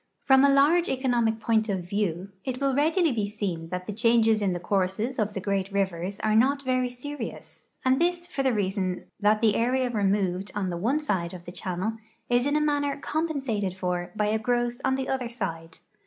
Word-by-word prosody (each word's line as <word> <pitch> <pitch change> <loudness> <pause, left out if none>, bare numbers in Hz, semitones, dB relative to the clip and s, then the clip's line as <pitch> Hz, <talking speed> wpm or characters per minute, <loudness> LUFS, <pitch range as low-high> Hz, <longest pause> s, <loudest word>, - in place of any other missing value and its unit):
From 265 -1 +6
a 280 - +6
large 295 +6 +4
economic 240 -4 +1
point 220 0 +1
of 190 -3 -1
view, 195 -1 -2
it 255 -1 -3
will 275 -1 +1
readil}^ 315 +2 +2
be 210 -3 -1
seen 190 -6 -4
that 180 +1 -4
the 210 - -4
changes 225 0 +3
in 200 -2 +1
the 175 - -2
courses 200 +7 -1
of 210 -1 0
the - - -1
great 195 0 -1
rivers 190 -1 -2
are 215 0 +2
not 275 +5 +3
very 255 -1 +1
serious, 250 +1 -8 0.2
and 260 +3 +3
this 350 0 +1
for 320 -6 -3
the 265 -1 +2
reason 190 -3 -1 0.2
that 210 +1 +3
the 220 -3 +4
area 250 +2 +1
removed 195 -3 0
on 190 -3 -1
the 170 - -3
one 235 - +1
side 190 - -2
of 175 -1 -11
the 175 - -7
channel 190 +4 -3 0.3
is 245 +2 +3
in 290 - +1
a 300 - +3
manner 285 -1 0
compensated 270 - -2
for 180 -1 -2
b}'' 210 0 +1
a 220 - +1
growth 240 +2 -1
on 265 0 +2
the 265 0 -3
other 255 -3 -2
side. 165 -8 -5
220 Hz, 205 wpm, -26 LUFS, 195-265 Hz, 0.3 s, From